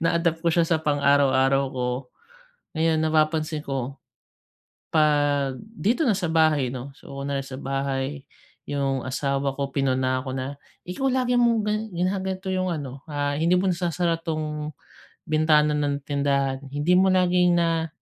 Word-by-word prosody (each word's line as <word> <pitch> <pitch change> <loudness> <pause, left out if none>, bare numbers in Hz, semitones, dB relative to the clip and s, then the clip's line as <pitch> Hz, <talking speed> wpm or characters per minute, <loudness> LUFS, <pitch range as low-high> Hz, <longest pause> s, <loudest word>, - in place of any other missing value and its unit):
Na-adapt 165 0 +1
ko - - +4
siya 165 0 +2
sa 165 - +3
pang-araw-araw 140 -2 +3
ko. 125 -1 -2 0.9
Ngayon 160 0 +1
napapansin 155 0 +1
ko, 135 -2 -4 0.9
'pag 145 -3 +2
dito 220 - -1
na 215 - +3
sa 185 - -2
bahay 155 -5 +3
'no, 130 +2 -6
so - - -13
una 140 0 -3
sa 135 - -7
bahay, 135 0 -3 0.4
yung 135 -2 -1
asawa 140 +1 -1
ko, 140 -1 -2
pinuna 130 -2 +1
ko 130 - -4
na, 130 +2 -4 0.3
"Ikaw, 180 +10 -2
lagi 250 -1 +1
mong 235 -2 +3
gina 210 +1 -1 0.3
ginaganto 190 0 -3
yung 185 0 0
ano, 140 -4 -6
ah, 145 -1 -1
hindi 165 +3 +2
mo 190 +2 +1
nasasara 175 -1 0
'tong 155 -2 -3 0.5
bintana 155 -1 +3
ng 145 -1 -1
tindahan, 140 -2 0
hindi 145 +5 +1
mo 190 - +4
laging 180 -1 +3
na 165 -1 +1
150 Hz, 145 wpm, -24 LUFS, 140-170 Hz, 0.9 s, ko